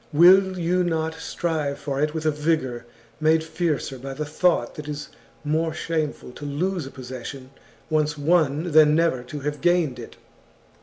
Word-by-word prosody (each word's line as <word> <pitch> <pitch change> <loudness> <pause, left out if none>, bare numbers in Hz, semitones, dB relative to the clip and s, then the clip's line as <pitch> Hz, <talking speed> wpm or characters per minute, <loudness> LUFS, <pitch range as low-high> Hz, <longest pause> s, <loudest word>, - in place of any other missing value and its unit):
Will 185 +4 +6
you 180 +1 +1
not 160 -2 -1
strive 160 -3 -2
for 140 -1 -3
it 150 +1 0
with 160 0 -3
a 155 - +4
vigour 150 -6 -1 0.3
made 160 +1 +3
fiercer 160 -5 -2
by 135 +1 -6
the 150 +2 -3
thought 150 -4 +1
that 150 -1 -8
it - - -3
is 145 -1 -6 0.3
more 160 +1 0
shameful 155 -6 -3
to 135 - -11
lose 160 +3 -2
a - - -7
possession 130 0 -8 0.4
once 150 -1 0
won 155 +1 +2
than 155 0 +6
never 165 -6 +2
to 145 +4 -8
have 145 +1 -3
gained 175 -7 +2
it. 115 - -9
155 Hz, 170 wpm, -24 LUFS, 140-165 Hz, 0.4 s, Will